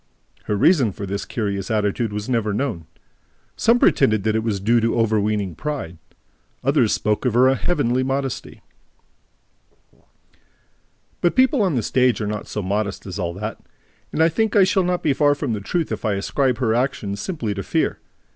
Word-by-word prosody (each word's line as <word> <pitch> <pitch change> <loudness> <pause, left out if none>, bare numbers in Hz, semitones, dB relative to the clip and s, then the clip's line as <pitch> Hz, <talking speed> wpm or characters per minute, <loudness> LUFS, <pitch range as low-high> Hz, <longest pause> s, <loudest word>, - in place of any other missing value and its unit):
Her 105 - -1
reason 130 - +4
for 100 - -6
this 100 +1 -4
curious 100 -4 -3
attitude 105 +1 0
was 105 0 -4
never 115 -5 0
known. 110 - -3 0.7
Some 230 +1 +3
pretended 110 - +3
that 110 0 +1
it 110 - +1
was 110 -3 -2
due 115 +4 +2
to 115 +1 0
overweening 105 -4 0
pride; 110 - -5 0.6
others 135 -5 +3
spoke 105 0 0
of 125 -4 0
her 130 +2 +5
heavenly 130 -5 0
modesty. 135 0 -3 2.6
But 175 - +2
people 260 0 +4
on 185 -7 +1
the 120 - 0
stage 125 +1 +2
are 105 - -2
not 105 0 -4
so 105 - -4
modest 100 +1 -2
as 100 +1 -6
all 85 -2 -3
that; 105 +3 -5 0.5
and 160 - +2
I 165 - +5
think 220 +6 0
that 205 - +5
I - - +8
shall 190 +1 +2
not 180 0 -1
be 145 - +3
far 145 +1 +3
from 140 -5 -2
the 105 - -3
truth 165 - -2
if - - -4
I 105 - +1
ascribe 125 +5 0
her 115 -3 +1
action 120 -5 -1
simply 115 - -3
to 100 - -4
fear. - - -1
115 Hz, 185 wpm, -21 LUFS, 105-140 Hz, 2.6 s, I